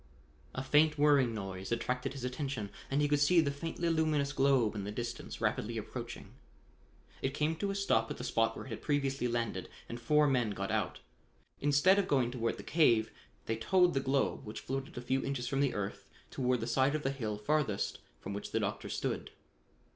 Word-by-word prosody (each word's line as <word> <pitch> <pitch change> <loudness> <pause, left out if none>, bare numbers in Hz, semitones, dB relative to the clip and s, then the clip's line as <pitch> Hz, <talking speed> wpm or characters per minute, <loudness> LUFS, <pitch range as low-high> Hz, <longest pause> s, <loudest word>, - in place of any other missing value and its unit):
A 130 - -2
faint 150 +3 +4
whirring 145 -4 +4
noise 95 -1 -5
attracted 125 +3 -1
his 135 -3 -7
attention, 125 -5 -3 0.2
and 140 +2 +2
he - - +3
could 145 0 +2
see 170 +5 +5
the 145 -3 +2
faintly 165 +4 -3
luminous 155 -3 +1
globe 135 -6 +3
in 105 -2 -4
the 100 - -4
distance, 120 +2 -5
rapidly - - -1
approaching. - - -7 0.9
It 135 +1 -1
came 155 +2 +1
to 200 +4 -1
a 195 - -2
stop 115 - +2
at - - -5
the - - -6
spot 115 -2 +1
where - - -7
it - - -10
had 115 - -6
previously 135 -3 0
landed 120 -2 -2 0.2
and 120 - -6
four 150 +6 +4
men 125 -5 +2
got 100 0 -2
out. - - -1 0.6
Instead 145 +8 +4
of 195 - 0
going 130 -4 +2
toward 115 -2 -1
the - - -8
cave, 115 -9 +3 0.3
they 110 - -1
towed 180 +9 +3
the 135 - +2
globe, 135 0 0
which 105 -2 -7
floated 135 0 -4
a - - -3
few 130 +2 0
inches 130 -3 -2
from 135 +2 -1
the 140 -3 +1
earth, 100 -1 -4 0.2
toward 125 -2 0
the - - -1
side 130 +4 +2
of 155 - -2
the 135 - +1
hill 110 -6 -3
farthest 110 -1 0 0.2
from 100 - -6
where 100 - -3
the - - +1
doctor - - -3
stood. - - -2
135 Hz, 205 wpm, -33 LUFS, 115-145 Hz, 0.9 s, see